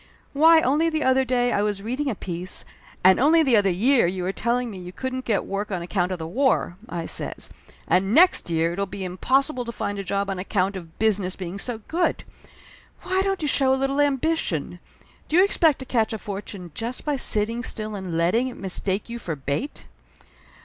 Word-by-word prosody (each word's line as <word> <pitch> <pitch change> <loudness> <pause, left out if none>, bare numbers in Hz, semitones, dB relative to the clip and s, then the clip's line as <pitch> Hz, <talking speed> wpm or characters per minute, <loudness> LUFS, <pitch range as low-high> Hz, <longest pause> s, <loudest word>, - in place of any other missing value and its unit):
Why, 320 +3 +6
only 300 +5 +2
the 315 -1 -1
other 260 0 +3
day 245 -1 +1
I 205 - +1
was 205 -1 -1
reading 260 +6 -2
a 230 - -2
piece 180 0 -4 0.2
" - - -24
"And 185 0 +7
only 320 +5 +5
the 260 -5 +3
other 205 -2 +4
year 230 +5 +3
you 180 +1 -3
were 185 - 0
telling 235 +3 -1
me 190 - -8
you 180 0 -8
couldn't 260 +5 -4
get 215 -4 0
work 200 +1 -3
on 180 -3 -2
account 180 +1 -1
of 185 - -2
the 160 - -6
war!" 240 0 +1
I 170 -1 -4
says. - - -3 0.4
"And 195 +2 +2
next 345 - +5
year 165 0 +1
it'll 200 +2 -2
be 190 +1 -6
impossible 255 +9 0
to 235 - -5
find 205 -2 -4
a - - -3
job 200 +1 -1
on 190 - -4
account 195 +1 0
of 170 -3 -9
business 200 -4 +1
being 185 +1 -6
so 225 0 -4
good! 345 +2 0 0.8
Why 375 +1 +1
don't 390 -3 -1
you - - +1
show 270 -2 +3
a - - -2
little 270 +2 +1
ambition? 290 +3 0 0.5
Do 310 - 0
you 375 - +7
expect 325 -7 +3
to 260 - -7
catch 230 -4 0
a - - -2
fortune 195 -3 -7
just 235 +9 -5
by 295 -1 +1
sitting 230 -2 0
still 215 -3 -3
and 185 -5 -4
letting 185 +10 +2
it 255 - -7
mistake 195 +1 -2
you 235 0 -6
for 165 -8 -4
bait?" 145 - -4
220 Hz, 210 wpm, -24 LUFS, 185-265 Hz, 0.8 s, And